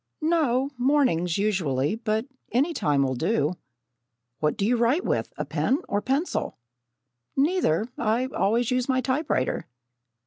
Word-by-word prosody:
"No, 285 -5 +2
mornings, 245 - +2
usually; 165 -9 0
but 220 0 -1 0.3
any 285 +8 +2
time 145 - +1
will 130 -1 0
do." 160 - 0 0.9
"What 150 -1 0
do 200 - 0
you 240 +4 +3
write 240 +9 +2
with - - -1
a - - -2
pen 270 - +1
or 205 - 0
a - - -8
pencil?" 275 - -1 0.8
"Neither, 275 - +2
I 235 +2 +1
always 225 +5 +1
use 250 +1 0
a 260 -1 +3
typewriter." 260 - -1
235 Hz, 140 wpm, -25 LUFS, 180-270 Hz, 0.9 s, you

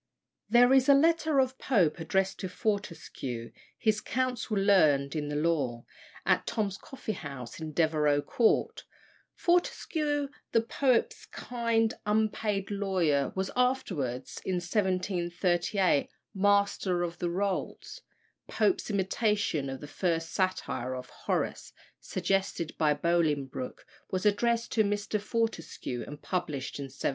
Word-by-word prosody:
There 245 +3 +6
is 265 0 +5
a 280 - +9
letter 315 0 +3
of 260 0 +1
Pope 180 - +2
addressed 190 +4 0
to 185 - -4
Fortescue, 160 - -3 0.3
his 220 -2 +1
"counsel 250 -3 -1
learned 155 -9 +4
in 150 -1 -2
the 145 - -3
law," 145 -7 0 0.4
at - - +2
Tom's 205 -4 -1
coffee 270 -5 -6
house, 140 - -7
in 160 -1 -5
Devereux 150 -2 +2
Court. 230 -2 +1 0.5
Fortescue, 305 -4 0 0.2
the 230 - +5
poet's 250 +1 0
kind, 230 -2 0
unpaid 210 -2 0
lawyer, 185 -8 +1
was 190 0 -2
afterwards 185 - -1
(in 190 - -1
1738) 180 -2 +1 0.2
Master 200 -2 +2
of 170 0 -4
the 175 - -1
Rolls. 190 +2 -3 0.5
Pope's 375 - +1
imitation 200 - 0
of 135 0 -6
the 145 - -7
first 165 0 -1
satire 185 -9 -1
of 125 -1 -8
Horace, - - -3 0.3
suggested 190 -4 -1
by 150 -2 +3
Bolingbroke, 145 -5 -1 0.2
was 185 +2 -2
addressed 230 +3 +2
to 220 - +3
Mr. 205 0 -1
Fortescue, 205 - -2
and 145 0 -8
published 150 -8 -3
in 140 - -3
1733. 135 0 -3
190 Hz, 125 wpm, -29 LUFS, 155-220 Hz, 0.5 s, a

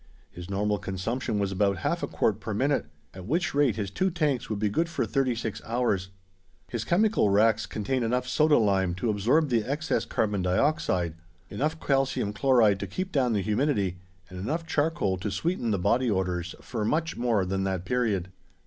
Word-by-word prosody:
His 90 +1 -9
normal 105 +1 0
consumption 105 +6 -3
was 100 -1 0
about 100 0 +1
half - - 0
a - - -1
quart - - 0
per - - -4
minute, - - +1 0.3
at 95 0 -9
which 170 +8 0
rate 140 -6 +3
his 100 -3 -3
two 190 - +1
tanks 150 -8 -1
would 110 - -2
be 105 +1 0
good 165 +12 0
for 170 - -1
thirty 135 -3 0
six 115 -2 -4
hours. 110 -6 0 0.6
His 120 -2 -3
chemical 205 - +2
racks 110 +1 +3
contained 120 +6 -2
enough 125 +2 0
soda 150 +4 +4
lime 95 -4 +2
to 110 +5 0
absorb 125 +10 +2
the 115 -3 +2
excess 145 +6 -1
carbon 105 -3 0
dioxide, 90 - +1 0.4
enough 155 +3 -1
calcium 135 -8 0
chloride 110 -4 +4
to - - -4
keep 185 +1 -4
down 130 -6 +2
the 100 -2 0
humidity 105 - 0 0.3
and 90 - -9
enough 155 - -2
charcoal 145 - 0
to 100 +4 -3
sweeten 165 - -1
the 105 - +1
body 115 +7 +2
odors 90 -3 -1
for 110 - -4
much 160 +9 0
more 115 -5 +1
than 95 +1 -1
that 95 -2 -2
period. 105 -7 0
110 Hz, 185 wpm, -27 LUFS, 95-135 Hz, 0.6 s, soda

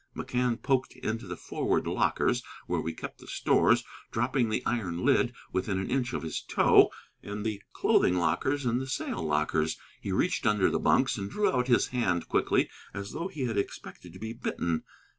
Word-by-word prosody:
McCann 125 -1 -1
poked 130 -1 0
into 110 -1 -4
the 90 -1 -5
forward - - -1
lockers - - +1 0.2
where - - -1
we 80 - -2
kept 80 - -8
the - - -14
stores, - - +3 0.3
dropping 120 +1 +1
the 110 - -1
iron 100 -6 -1
lid 135 -3 +4 0.2
within 95 +1 0
an 95 - -3
inch 125 -2 0
of - - -2
his 80 - -3
toe, - - +5 0.3
and 105 +1 -5
the 105 -2 -2
clothing 90 - +3
lockers 130 - +1
and 120 +1 +1
the 130 - -5
sail 130 - -2
lockers. 75 0 0 0.2
He 100 - -3
reached 125 - +1
under 105 -2 +3
the - - +1
bunks, - - +3
and 100 0 -4
drew 210 - +1
out 125 -1 +1
his 120 - +3
hand 100 -9 0
again - - -24
quickly, - - +2 0.3
as 100 +1 -5
though 165 +4 -3
he 140 -8 -3
expected 100 -4 -4
to - - -10
be 110 +1 -5
bitten. 85 -8 -2
110 Hz, 190 wpm, -29 LUFS, 90-125 Hz, 0.3 s, toe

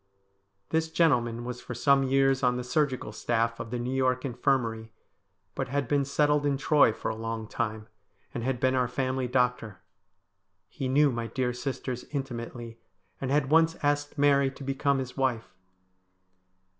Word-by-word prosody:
This 160 0 0
gentleman 120 -8 +1
was 125 0 -5
for 120 - -7
some 140 +3 +4
years 135 0 +2
on 125 -1 +2
the 125 - -3
surgical 130 -3 -1
staff 115 +1 -1
of 115 - -6
the 125 - -3
New 120 +2 -3
York 130 0 +1
Infirmary, 120 -3 -1 0.6
but 135 - -3
had 140 0 -1
been 140 +1 +1
settled 150 +1 +2
in 140 -1 +1
Troy 145 -3 +4
for 110 - -4
a - - -5
long 115 0 -4
time, 110 -1 -3 0.5
and 120 - -4
had 130 0 -1
been 130 +1 +2
our 125 -1 +2
family 130 +1 -1
doctor. 125 -5 0 0.9
He 135 - -5
knew 145 +2 +4
my 115 -1 -3
dear 125 +2 -1
sisters 125 0 -4
intimately, 120 -4 -6 0.4
and 135 - -2
had 140 0 +1
once 165 +1 +4
asked 145 +1 0
Mary 140 -1 +4
to 135 +1 -11
become 135 +1 0
his 130 -1 -5
wife. 125 -4 -1
130 Hz, 165 wpm, -28 LUFS, 120-140 Hz, 0.9 s, some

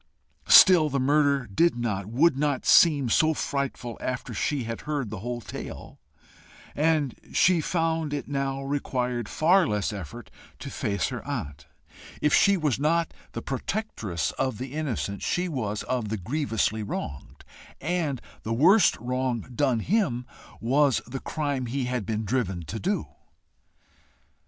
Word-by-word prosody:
Still 175 -6 +8
the 140 -1 -1
murder 140 0 +2
did 165 - +2
not, 105 -5 -2
would 140 +7 +3
not 145 -1 -1
seem 145 -6 +6
so 155 +7 +3
frightful 135 -5 -3
after 130 -1 -4
she 145 -4 -1
had 115 0 -5
heard 145 -8 -3
the 105 - -5
whole 120 +3 -4
tale, - - -8 0.8
and 150 -3 +1 0.2
she 180 -2 +4
found 165 -2 -1
it 145 -1 -3
now 135 -1 -2
required 125 -4 -2
far 180 +4 +3
less 105 0 -1
effort 90 -8 -8 0.3
to - - -8
face 100 -2 -1
her - - -6
aunt. 70 0 -5 0.5
If 150 - +1
she 200 -1 +5
was 150 -7 0
not 165 +3 +1 0.2
the - - -5
protectress 115 - -3
of 130 -5 0
the 130 +3 -6
innocent, 125 -10 -3
she 180 +1 0
was 110 - -3
of 120 -5 -2
the 110 - -2
grievously 110 - -1
wronged, 80 -8 -6 0.3
and 155 -4 -1 0.2
the 110 - -3
worst 175 - +5
wrong 125 0 -2
done 125 -3 +1
him 145 - 0 0.3
was 135 +2 +2
the 130 +3 -6
crime 145 -5 -3
he 130 +2 -2
had 125 -5 -3
been 110 0 -2
driven 95 -6 -1
to 110 +9 -5
do. - - -1
130 Hz, 145 wpm, -26 LUFS, 115-150 Hz, 0.8 s, Still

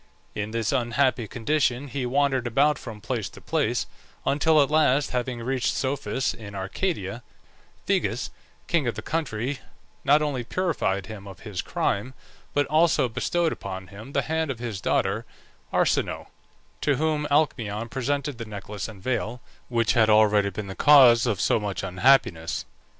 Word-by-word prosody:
In 105 0 -3
this 115 -1 -1
unhappy 125 -1 +1
condition 130 +3 0
he 130 -1 -3
wandered 135 -1 +1
about 140 +5 +3
from 110 -4 -9
place 110 -2 -3
to - - -13
place, - - 0 0.4
until 155 +2 +3
at 140 0 +3
last 150 -2 +3
having 125 -1 -2
reached 130 0 0
Psophis 135 -1 -1
in 100 -3 -10
Arcadia, 100 - -3 0.6
Phegeus, - - 0 0.3
king 160 -7 +1
of 120 - -1
the - - -6
country, 140 -4 -2 0.4
not 150 +2 +4
only 140 -5 -2
purified 120 - -1
him 100 -1 -9
of 95 -3 -11
his 105 -5 -4
crime, 125 +6 -2 0.4
but 145 0 +3
also 155 -2 +3
bestowed 165 +8 0
upon 95 -1 -6
him 110 +7 -11
the - - +1
hand 160 -1 -1
of 135 - -3
his 115 -4 -5
daughter - - 0 0.5
Arsinoe, - - 0 0.5
to 145 - +2
whom 150 +1 0
Alcmaeon 115 -7 +1
presented 140 +1 -2
the 115 - -4
necklace 105 -2 -6
and 100 -4 -12
veil, 120 -1 -2 0.3
which 115 -2 +2
had 110 -2 +4
already 105 -1 +5
been 100 +2 -5
the 95 - -6
cause 125 -2 +7
of 105 -5 0
so - - +2
much 100 -2 -4
unhappiness. 95 -2 +2
120 Hz, 155 wpm, -25 LUFS, 105-145 Hz, 0.6 s, cause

